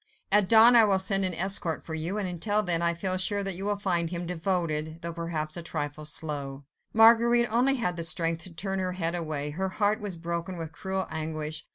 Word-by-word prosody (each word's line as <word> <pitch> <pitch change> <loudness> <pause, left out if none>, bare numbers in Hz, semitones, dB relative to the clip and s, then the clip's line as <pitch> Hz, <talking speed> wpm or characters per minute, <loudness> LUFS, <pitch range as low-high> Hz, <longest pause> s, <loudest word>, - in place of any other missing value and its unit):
At 205 -1 +5
dawn 230 +2 +7
I 230 - +7
will 200 -3 +3
send 195 0 +2
an 180 -2 0
escort 175 -2 +2
for 160 - -7
you; 165 +6 -3
until 205 +2 0
then, 170 -3 0
I 170 0 +1
feel 185 +2 0
sure 200 +2 +1
that 195 0 0
you 190 +3 -4
will 205 0 -1
find 175 -4 -1
him 175 0 -5
devoted, 165 -2 -3
though 170 0 -4
perhaps 165 -2 -4
a - - -5
trifle 150 -2 -5
slow." 145 -3 -3 0.3
Marguerite 235 +2 +5
only 260 +4 +3
had 180 -9 -2
the 170 - -3
strength 165 -1 0
to 185 - -9
turn 195 +2 -3
her 185 -1 -2
head 170 -2 -1
away. 155 -4 -3
Her 190 +5 -3
heart 210 +2 0
was 205 -4 -5
broken 170 +2 -5
with 165 -1 -6
cruel 190 +4 -3
anguish. 155 -1 -4
175 Hz, 215 wpm, -27 LUFS, 165-195 Hz, 0.3 s, dawn